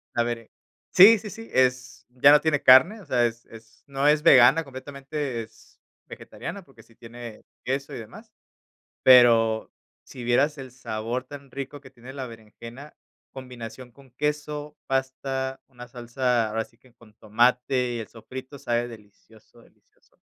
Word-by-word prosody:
La 120 - +2
bere 115 -1 -5 0.4
sí, 210 +5 +8
sí, 210 +1 -8
sí, 225 +2 -11
es 130 0 0
ya 130 +3 +5
no 150 - +6
tiene 155 -3 0
carne, 160 +13 +6
o - - -15
sea, 120 -2 +1
es 115 0 -4
es 110 -1 -16
no 140 +1 -1
es 150 0 +3
vegana 135 0 +6
completamente, 135 -1 -6
es 110 0 -20 0.3
vegetariana, 200 - -9
porque 135 -8 -19
sí 115 - -25
tiene 115 -1 -11 0.2
queso 135 +2 -3
y - - -6
demás. 110 - -13 0.7
Pero 115 -3 +5 0.3
si 125 - -11
vieras 140 +6 +1
el 130 -2 -9
sabor 120 0 -5
tan 140 0 -12
rico 140 +2 -7
que 135 - -15
tiene 130 0 -13
la 135 -2 -6
berenjena, 115 +5 -12 0.4
combinación 125 -1 -10
con 135 +1 -20
queso, 150 +2 -4
pasta, 135 0 -3
una 125 -2 -12
salsa, 120 -1 -1
ahora 110 +1 -2
sí 115 - -28
que 125 0 -25
con 115 -2 -21
tomate 125 +3 +1
y - - -4
el 110 - -7
sofrito, 130 +5 -10
sabe 120 -1 -1
delicioso, 110 -1 -17
delicioso. - - -29
125 Hz, 160 wpm, -25 LUFS, 115-140 Hz, 0.7 s, sí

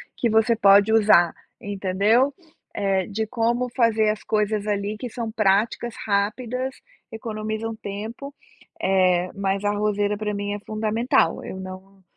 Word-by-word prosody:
que 235 - 0
você 220 +1 +3
pode 205 0 +5
usar, 205 -6 +5 0.3
entendeu, 205 +7 +1 0.4
eh, 195 -2 0
de 220 +1 -2
como 240 +1 0
fazer 225 -3 +3
as 215 0 -3
coisas 210 -1 0
ali 205 +1 -1
que 245 +2 -6
são 230 -1 -5
práticas, 215 +2 +1
rápidas, 235 +6 -1 0.4
economizam 220 0 -4
tempo, 220 +7 -7 0.5
eh, 185 -2 +2
mas 195 0 -1
a 205 - +3
arrozeira 205 0 0
para 210 -1 -3
mim 205 0 -3
é 205 - -4
fundamental, 220 +3 0
eu 190 - -7
não 190 +1 -10
210 Hz, 140 wpm, -23 LUFS, 200-225 Hz, 0.5 s, pode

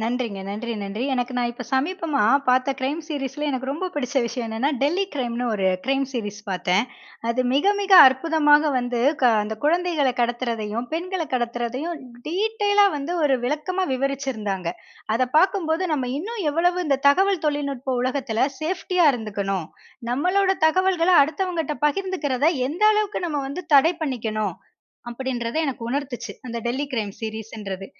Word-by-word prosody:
நன்றிங்க. 230 -2 -2
நன்றி, 220 +4 -4
நன்றி 200 +4 -4
எனக்கு 250 0 -1
நான் 240 -1 0
இப்போ 240 +1 -8
சமீபமா 305 - 0 0.3
பாத்த 255 +2 +3
கிரைம் 275 +4 -1
சீரிஸில் 295 -1 -4
எனக்கு 260 0 -3
ரொம்ப 320 +7 -3
பிடிச்ச 280 -1 -3
விஷயம் 235 0 -3
என்னென்னா, 225 +6 0
"டெல்லி 345 +8 +2
கிரைம்"னு 245 -2 -2
ஒரு 195 -3 0 0.2
கிரைம் 270 +1 +1
சீரிஸ் 215 -5 -5
பாத்தேன். 185 +1 +1 0.5
அது 235 +2 +1
மிக, 345 +9 +4
மிக 400 -1 -1 0.2
அற்புதமா 295 +3 +3 0.2
வந்து 245 -1 -1 0.4
அந்த 215 +1 -4
கொழந்தகள 325 -3 +2
கடத்துவதையும், 235 -1 -2
பெண்கள 355 +2 -2
கடத்துறதையும் 245 +6 -2 0.3
டீட்டெய்லா 410 +3 +2
வந்து 290 +5 -3
ஒரு 280 -3 +3
விளக்கமா 360 +7 -1
விவரிச்சிருந்தாங்க. 255 -9 -2 0.5
அத 250 +2 +1
பாக்கும்போது 345 -2 +1
நம்ம 265 -4 -2
இன்னும் 420 +4 -4
எவ்வளவு 355 +3 +1
இந்த 275 -2 +2
தகவல் 380 +4 +3
தொழில்நுட்ப 275 -3 -2
உலகத்தில 255 -2 0
சேஃப்டியா 360 +1 +1
இருந்துக்கணும். 200 -6 -3 0.5
நம்மளோட 370 +8 +2 0.2
தகவல்கள்ல 365 0 +3
அடுத்தவங்ககிட்ட 325 -1 -2
பகிர்ந்துக்கிறத 300 -6 -1 0.2
எந்த 345 +9 -1
அளவுக்கு 420 -4 -1
நம்ம 295 -3 -2
வந்து 290 +7 -5
தடை 320 +5 +6
பண்ணிக்கணும். 215 - -2 0.5
அப்படின்றத 240 0 -3
எனக்கு 270 -5 -4
உணர்த்து 245 -4 -4
அந்த 235 -1 -4
டெல்லி 255 +4 -1
கிரைம் 215 -5 -2
சீரிஸ்ன்றது. 215 -3 -6
270 Hz, 135 wpm, -23 LUFS, 235-330 Hz, 0.5 s, தடை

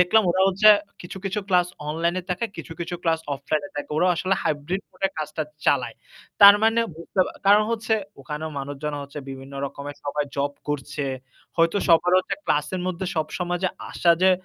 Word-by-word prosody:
দেখলাম 180 +5 +5
ওরা 185 +2 +2
হচ্ছে 200 +3 +5 0.3
কিছু, 175 - -9
কিছু 200 +2 -1
ক্লাস 180 -2 +4 0.2
অনলাইনে 170 +4 0
থাকে, 180 +5 -1
কিছু, - - -7
কিছু 170 +1 -3
ক্লাস 165 -1 +1
অফলাইনে 155 +7 -2
থাকে। 145 - -5
ওরা 180 - +3
আসলে 185 +3 +1
হাইব্রিড 155 +6 -1
মুডে 195 - -1
কাজটা 155 +1 -3 0.2
চালায়। 125 -5 +2 0.5
তার 200 0 +11
মানে 225 +1 +4
বুঝতে 170 +3 -2 0.3
কারণ 205 +1 +7
হচ্ছে 225 -1 0 0.3
ওখানে 150 +2 -5
মানুষজন 145 +2 -4
হচ্ছে 140 +1 -8
বিভিন্ন 135 +1 -9
রকমের 140 +1 -8
সবাই 145 +1 -1
জব 140 +1 0 0.2
করছে। 145 0 -3 0.5
হয়তো 165 +3 +3
সবার 175 +2 +5
হচ্ছে 185 - -2
ক্লাসের 150 +5 0
মধ্যে 185 +1 -3
সবসময় 175 +2 -2
যে 185 - +4 0.2
আসা 170 - +2
যে 190 - +7
170 Hz, 170 wpm, -24 LUFS, 145-185 Hz, 0.5 s, তার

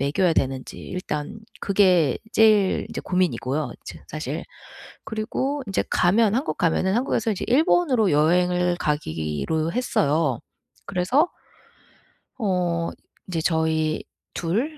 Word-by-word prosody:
먹여야 150 +6 +2
되는지 130 -1 -2
일단 155 -2 -5 0.2
그게 185 -8 +3 0.2
제일 215 -3 +4
이제 - - -4
고민이고요 155 -6 -1
지금 - - -9
사실. - - -4 0.6
그리고 260 +6 -2
인제 195 - 0
가면 210 +4 +3
한국 275 +6 -1
가면은 185 +3 +1
한국에서 230 -3 0
이제 195 - -4
일본으로 260 - +3
여행을 180 +3 +2
가기로 145 - -2
했어요. 155 - +1 0.5
그래서 200 - +2 1.1
어 180 -6 0 0.4
이제 175 -3 -2
저희 160 -1 0 0.3
2 235 - -2
180 Hz, 250 characters per minute, -24 LUFS, 155-215 Hz, 1.1 s, 제일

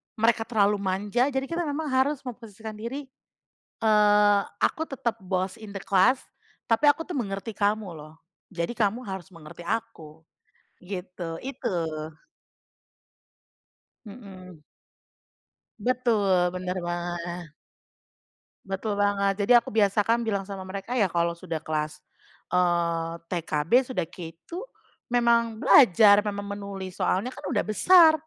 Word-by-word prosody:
mereka 225 0 +2
terlalu 205 -2 +2
manja 200 +6 0
jadi 265 -1 -1
kita 335 +3 -2
memang 290 0 -3
harus 265 +2 +1
memposisikan 220 -3 -8
diri, 260 +5 -6 0.7
eee, 210 -1 +5 0.2
aku 320 +1 +1
tetap 240 -4 -3
boss 185 0 -2
in 215 -2 -10
the 195 - -4
class, 200 +7 +3 0.5
tapi 230 +6 +3
aku 310 +3 +4
tuh 340 -5 -5
mengerti 200 -1 -3
kamu 205 -1 0
loh, 155 -1 -11 0.4
jadi 170 +2 -2
kamu 230 +1 0
harus 190 -4 -6
mengerti 165 +1 -12
aku, 165 -9 -5 0.6
gitu 180 -3 -6
itu. 265 -8 -3 2.3
Mhm. 190 -7 -12 1.2
Betul 245 +1 +1 0.4
bener 180 0 -3
banget. 175 0 -4 1.2
Betul 195 +2 -3
banget, 200 0 +1
jadi 240 +3 +7
aku - - -12
biasakan 220 +2 +2
bilang 200 -3 -1
sama 195 -1 -6
mereka 195 +6 -5
ya 200 -6 +2
kalau 170 0 0
sudah 170 -2 -5
kelas, 155 -1 -3 0.5
eee, 170 -2 +1 0.2
TKB 160 -2 -2 0.2
sudah 180 -8 -1
K2 165 -2 -11 0.6
memang 235 -2 +2
belajar 205 - +7
memang 200 -1 -4
menulis 195 -2 -7
soalnya 200 +7 0
kan - - -12
udah 230 -7 +1
besar, 320 - +6
200 Hz, 120 wpm, -26 LUFS, 180-230 Hz, 2.3 s, jadi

